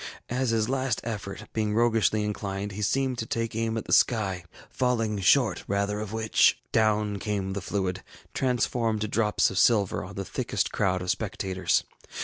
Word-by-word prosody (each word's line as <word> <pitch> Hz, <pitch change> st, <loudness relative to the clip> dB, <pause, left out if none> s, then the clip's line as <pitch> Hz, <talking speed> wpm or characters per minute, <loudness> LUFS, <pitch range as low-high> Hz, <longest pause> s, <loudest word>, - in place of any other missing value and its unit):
As 125 Hz, 0 st, 0 dB
his 110 Hz, -1 st, +1 dB
last 130 Hz, -2 st, 0 dB
effort, 105 Hz, -4 st, -5 dB
being 105 Hz, -1 st, 0 dB
roguishly 115 Hz, -2 st, +2 dB
inclined, 100 Hz, -1 st, -3 dB
he 100 Hz, +2 st, -6 dB
seemed 130 Hz, +3 st, 0 dB
to 115 Hz, -, -3 dB
take 115 Hz, -1 st, -2 dB
aim 115 Hz, 0 st, -1 dB
at 110 Hz, -, -4 dB
the -, -, -1 dB
sky, 95 Hz, -7 st, +2 dB, 0.2 s
falling 115 Hz, -5 st, 0 dB
short 110 Hz, +1 st, +3 dB
rather 100 Hz, +1 st, 0 dB
of 105 Hz, -1 st, -5 dB
which, 110 Hz, 0 st, +3 dB
down 105 Hz, -2 st, +2 dB
came 100 Hz, -2 st, -2 dB
the 100 Hz, -, -3 dB
fluid, 95 Hz, -1 st, -2 dB, 0.3 s
transformed 120 Hz, -3 st, 0 dB
to 110 Hz, -, 0 dB
drops 105 Hz, 0 st, +2 dB
of 95 Hz, -, 0 dB
silver, 105 Hz, -5 st, +3 dB
on 100 Hz, +3 st, -9 dB
the 100 Hz, -, -4 dB
thickest -, -, -2 dB
crowd 95 Hz, -1 st, 0 dB
of -, -, -5 dB
the -, -, -5 dB
spectators. 95 Hz, -2 st, 0 dB
105 Hz, 175 wpm, -27 LUFS, 100-115 Hz, 0.3 s, short